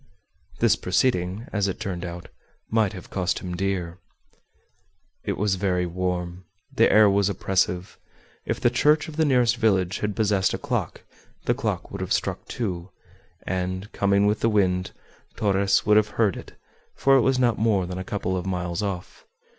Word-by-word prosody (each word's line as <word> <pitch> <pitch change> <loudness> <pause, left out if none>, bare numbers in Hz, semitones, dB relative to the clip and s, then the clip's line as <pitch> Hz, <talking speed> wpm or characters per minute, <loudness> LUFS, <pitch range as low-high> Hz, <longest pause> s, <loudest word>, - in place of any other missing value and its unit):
This - - +4
proceeding, 95 -3 0
as 105 -2 +1
it 95 - -4
turned 90 -3 -4
out, 85 0 -7 0.4
might 110 -3 +2
have 90 -3 -10
cost 90 -1 0
him 90 -1 -5
dear. 90 -2 -2 1.2
It - - -2
was 100 -2 +1
very 90 -2 +1
warm; 90 0 -3 0.3
the 115 - +4
air 110 -1 +7
was 100 0 +3
oppressive. 95 -2 -1 0.4
If - - -3
the 120 - +3
church 150 +5 +3
of 155 - -8
the 160 0 +2
nearest 125 -4 +3
village 95 -4 +1
had 105 -1 -2
possessed 100 -3 +1
a - - -3
clock, - - -3 0.4
the - - +3
clock - - -3
would - - -6
have - - -1
struck - - -2
two, 95 -6 -4 0.6
and, 95 +2 -3
coming 100 0 +2
with 105 +1 +2
the 115 - +2
wind, 90 -3 +1 0.5
Torres 100 -1 +2
would 105 0 +5
have 105 -1 +4
heard 110 -4 +3
it, - - -10 0.4
for 135 0 +4
it - - +4
was 130 +1 +2
not 120 -3 +2
more 105 -4 +2
than 90 +1 -5
a - - -4
couple 95 -1 -2
of 90 0 -3
miles 90 0 -2
off. 95 -4 -5
95 Hz, 175 wpm, -24 LUFS, 90-110 Hz, 1.2 s, air